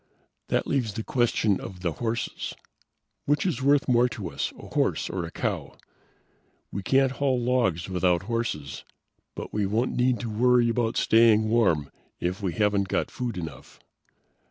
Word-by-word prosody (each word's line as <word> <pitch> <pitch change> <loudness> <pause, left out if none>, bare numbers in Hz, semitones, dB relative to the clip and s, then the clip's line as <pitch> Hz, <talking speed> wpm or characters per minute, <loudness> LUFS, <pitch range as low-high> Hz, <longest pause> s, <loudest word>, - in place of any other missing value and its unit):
"That - - 0
leaves 120 -7 -1
the 110 - -3
question 115 -5 +1
of 90 -2 -8
the 85 -2 0
horses. 115 +6 -3 0.7
Which 145 +3 +1
is 155 -8 -1
worth 140 +1 +3
more 125 -1 +4
to 100 -7 -6
us: 70 - -2
a - - -11
horse - - 0
or 90 -1 -3
a 80 - -8
cow? - - -3 0.9
We 100 - -4
can't 135 +6 +3
haul 135 -2 0
logs 120 -9 +1
without 90 -1 +1
horses, 110 - -3 0.5
but - - -7
we 105 -2 0
won't 115 +5 0
need 125 -2 +2
to 120 - -4
worry 120 +2 +4
about 115 -1 0
staying 110 -1 +4
warm 90 -11 +2 0.3
if 90 +4 -2
we 95 -4 -1
haven't 105 -2 +1
got - - -1
food 120 -5 -4
enough." 80 -4 -8
110 Hz, 160 wpm, -26 LUFS, 95-125 Hz, 0.9 s, more